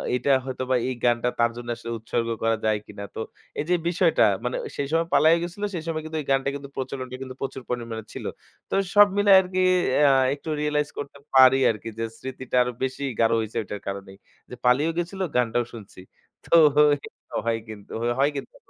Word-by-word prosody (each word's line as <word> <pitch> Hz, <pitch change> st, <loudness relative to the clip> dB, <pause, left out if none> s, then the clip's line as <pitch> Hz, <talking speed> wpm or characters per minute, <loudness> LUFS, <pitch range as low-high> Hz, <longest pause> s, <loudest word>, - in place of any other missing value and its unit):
এটা 125 Hz, +3 st, -1 dB, 0.2 s
হয়তোবা 130 Hz, 0 st, -2 dB
এই -, -, -1 dB
গানটা 120 Hz, 0 st, +2 dB
তার 115 Hz, 0 st, +3 dB
জন্য 120 Hz, 0 st, -7 dB
আসলে 115 Hz, 0 st, -7 dB
উৎসর্গ 115 Hz, +1 st, -2 dB, 0.2 s
করা 115 Hz, 0 st, +3 dB
যায় 110 Hz, -1 st, +2 dB
কিনা। 100 Hz, -, -9 dB
তো -, -, -5 dB, 0.4 s
এই -, -, -1 dB
যে 180 Hz, -, +4 dB
বিষয়টা 175 Hz, -1 st, +2 dB, 0.2 s
মানে 125 Hz, -, -1 dB, 0.2 s
সেই 140 Hz, -, -1 dB
সময় 165 Hz, +1 st, +1 dB
পালাইয়া 160 Hz, +2 st, +6 dB
গেছিল, 180 Hz, +4 st, -6 dB
সেই 170 Hz, -3 st, -4 dB
সময় 155 Hz, -1 st, -2 dB
কিন্তু 160 Hz, 0 st, -4 dB
এই -, -, -10 dB
গানটা 135 Hz, 0 st, +2 dB
কিন্তু 140 Hz, -1 st, -8 dB
প্রচলনটা 130 Hz, -1 st, -5 dB
কিন্তু 130 Hz, -1 st, -7 dB
প্রচুর 135 Hz, -1 st, -4 dB
পরিমাণে 115 Hz, -3 st, -4 dB
ছিল। -, -, -7 dB, 0.4 s
তো -, -, -6 dB, 0.2 s
সব 205 Hz, 0 st, +9 dB
মিলায় 205 Hz, -1 st, +6 dB
আরকি 185 Hz, 0 st, -3 dB, 0.5 s
আ -, -, +6 dB, 0.2 s
একটু 145 Hz, +3 st, -8 dB
রিয়ালাইজ 150 Hz, -1 st, 0 dB
করতে 140 Hz, 0 st, -7 dB, 0.2 s
পারি 130 Hz, 0 st, +8 dB
আরকি 110 Hz, +1 st, -7 dB
যে -, -, -1 dB
স্মৃতিটা 130 Hz, -1 st, -6 dB
আরো 125 Hz, -, -3 dB
বেশি 130 Hz, +1 st, -3 dB, 0.2 s
গাঢ় 115 Hz, 0 st, +4 dB
হইছে 110 Hz, +1 st, -4 dB
এটার 105 Hz, 0 st, -7 dB
কারণেই। 100 Hz, 0 st, -6 dB, 0.3 s
যে 125 Hz, -, -7 dB
পালিয়েও 140 Hz, +7 st, +3 dB
গেছিল 175 Hz, +3 st, -3 dB
গানটাও 120 Hz, -1 st, +1 dB
শুনছি। 105 Hz, -5 st, -11 dB, 0.4 s
তো -, -, -6 dB, 0.5 s
এটা -, -, -13 dB
হয় 115 Hz, -1 st, +1 dB
কিন্তু 105 Hz, -2 st, -11 dB, 0.3 s
হয় 140 Hz, +1 st, +4 dB
কিন্তু। 140 Hz, -, -7 dB
130 Hz, 195 wpm, -25 LUFS, 115-150 Hz, 0.5 s, সব